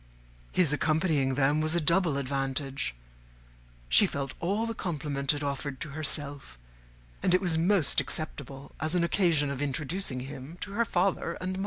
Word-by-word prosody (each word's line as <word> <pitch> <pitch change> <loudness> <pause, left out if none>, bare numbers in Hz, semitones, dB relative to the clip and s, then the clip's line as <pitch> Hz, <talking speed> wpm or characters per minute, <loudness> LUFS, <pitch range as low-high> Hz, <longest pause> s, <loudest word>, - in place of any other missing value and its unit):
His 165 -6 +3
accompanying 155 -3 +1
them 145 +3 +2
was 155 +2 +2
a - - +3
double 170 -2 +3
advantage: 135 - -2 0.9
she - - +6
felt 140 -1 -4
all 200 +6 0
the 230 - -2
compliment 145 -8 -1
it 145 0 -3
offered 140 -1 -3
to - - -4
herself; 145 - -4 0.6
and 180 - +3
it - - +4
was 180 -4 0
most 170 0 +3
acceptable 140 -3 -4
as 155 +4 0
an 175 - +3
occasion 170 -5 +2
of 140 0 -4
introducing 145 0 -2
him 140 +4 -8
to 200 - -5
her 230 +3 +1
father 180 -3 0
and 185 +1 -4
mother. 185 - -4
150 Hz, 165 wpm, -29 LUFS, 140-175 Hz, 0.9 s, she